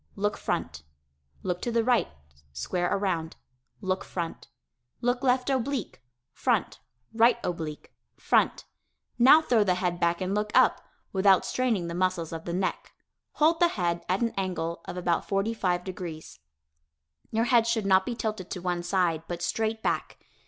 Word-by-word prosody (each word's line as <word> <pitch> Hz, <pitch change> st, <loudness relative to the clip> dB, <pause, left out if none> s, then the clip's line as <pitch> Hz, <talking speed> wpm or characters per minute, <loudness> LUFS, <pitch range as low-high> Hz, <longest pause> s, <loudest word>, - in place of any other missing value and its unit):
Look 205 Hz, +1 st, 0 dB
front. 75 Hz, -3 st, -3 dB, 0.6 s
Look 180 Hz, -1 st, -2 dB
to 240 Hz, -, -2 dB
the 230 Hz, 0 st, +2 dB
right 245 Hz, 0 st, +3 dB, 0.5 s
(square 175 Hz, -, -1 dB
around). 175 Hz, -5 st, -1 dB, 0.5 s
Look 190 Hz, -1 st, -1 dB
front. 170 Hz, -2 st, -5 dB, 0.5 s
Look 245 Hz, +1 st, 0 dB
left 255 Hz, -1 st, +2 dB
oblique. 260 Hz, -, -2 dB, 0.3 s
Front. -, -, 0 dB, 0.3 s
Right 230 Hz, +2 st, +5 dB
oblique. 160 Hz, -4 st, -5 dB, 0.2 s
Front. -, -, +2 dB, 0.5 s
Now 270 Hz, +6 st, +8 dB
throw 230 Hz, -7 st, +3 dB
the 185 Hz, -3 st, +2 dB
head 180 Hz, -1 st, -1 dB
back 170 Hz, -1 st, +1 dB
and 185 Hz, 0 st, -2 dB
look 210 Hz, +1 st, 0 dB
up -, -, +4 dB, 0.3 s
(without 190 Hz, -1 st, +4 dB
straining 235 Hz, -8 st, 0 dB
the 170 Hz, -, -4 dB
muscles 175 Hz, -2 st, -1 dB
of 165 Hz, 0 st, -6 dB
the 170 Hz, -, -3 dB
neck) 185 Hz, +1 st, -2 dB, 0.4 s
hold 325 Hz, +2 st, +3 dB
the 345 Hz, -, +6 dB
head 175 Hz, -, -1 dB
at 185 Hz, +4 st, +1 dB
an 230 Hz, -1 st, 0 dB
angle 170 Hz, -3 st, -2 dB
of -, -, -6 dB
about 175 Hz, -2 st, 0 dB
45 195 Hz, -3 st, 0 dB
degrees. 175 Hz, -, -7 dB, 0.9 s
Your 225 Hz, +1 st, +1 dB
head 235 Hz, -2 st, +4 dB
should 230 Hz, -3 st, 0 dB
not 190 Hz, -1 st, +5 dB
be 240 Hz, -, -4 dB
tilted 215 Hz, -5 st, -4 dB
to -, -, -4 dB
one 175 Hz, -1 st, -2 dB
side, 175 Hz, -3 st, +1 dB
but 175 Hz, 0 st, -5 dB
straight 220 Hz, +5 st, -1 dB
back. -, -, -1 dB
190 Hz, 160 wpm, -27 LUFS, 175-225 Hz, 0.9 s, Now